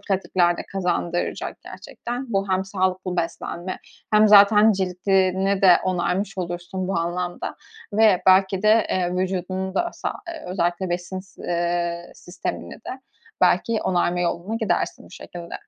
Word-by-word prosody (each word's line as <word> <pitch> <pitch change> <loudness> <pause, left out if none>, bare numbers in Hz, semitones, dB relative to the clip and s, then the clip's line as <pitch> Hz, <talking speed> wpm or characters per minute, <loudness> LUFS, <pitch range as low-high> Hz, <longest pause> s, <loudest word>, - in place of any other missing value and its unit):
pratikler 185 -3 +1
de - - -5
kazandıracak 175 -2 -2
gerçekten. 245 0 -7
Bu 195 0 0
hem 185 0 +1
sağlıklı 185 -1 -1
beslenme 175 +2 -4 0.3
hem 215 0 +6
zaten 210 +1 +7
cildini 190 +1 +1
de 180 -2 +8
onarmış 185 +2 -1
olursun 175 +1 -4
bu 190 -3 0
anlamda 175 +1 -3 0.4
ve 210 -3 +4
belki 190 +1 +4
de, 215 0 +4
eee, 180 -1 0
vücudunu 185 +1 -2
da 345 - 0
sa - - -4 0.3
ııı, - - -7
özellikle 175 0 -1
besin 180 +2 -3
s 190 - -16
eee, 170 0 -1
sistemini 175 - -6
de 260 - -8 0.4
belki 230 -2 +3
onarma 175 -1 +1
yoluna 175 +4 -2
gidersin 205 -7 -1
bu - - -17
şekilde. 170 -2 -9
185 Hz, 140 wpm, -23 LUFS, 175-195 Hz, 0.4 s, de